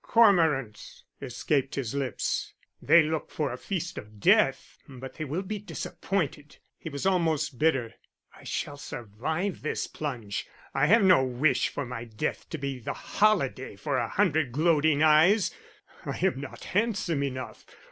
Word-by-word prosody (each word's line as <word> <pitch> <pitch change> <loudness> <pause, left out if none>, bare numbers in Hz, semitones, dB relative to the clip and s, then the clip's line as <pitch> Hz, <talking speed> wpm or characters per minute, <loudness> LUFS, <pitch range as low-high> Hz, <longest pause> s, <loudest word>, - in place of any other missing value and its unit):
"] - - -47
"Cormorants!" 160 - +2 0.2
escaped 140 -2 -1
his 130 -4 -3
lips. 135 -4 -2 0.3
"They 170 - +6
look 155 0 -2
for 150 -4 -2
a - - -5
feast 175 -1 -4
of 105 -1 -13
death, - - +3
but 130 0 -9
they 155 - -5
will 155 +7 -3
be 210 +2 -4
disappointed." 160 -7 -4 0.2
He 160 - -6
was 140 +1 -5
almost 160 -8 +1
bitter. 135 -8 +1 0.4
"I - - -16
shall 145 - -4
survive 145 - -4
this 155 - -2
plunge. 120 -9 -5 0.3
I 140 +2 +2
have 225 +5 +5
no 185 -8 +6
wish 130 +4 +1
for 145 - -4
my 120 -1 -6
death 110 -2 -4
to 160 - -4
be 140 -2 -4
the 120 - -4
holiday 155 - 0
for 130 +7 -2
a 115 - -2
hundred 160 -9 +1
gloating 155 0 +3
eyes, 160 +7 +5 0.5
I - - -4
am 170 -8 0
not 140 - -9
handsome 195 -7 0
enough. 130 -2 -5
150 Hz, 155 wpm, -28 LUFS, 130-170 Hz, 0.5 s, They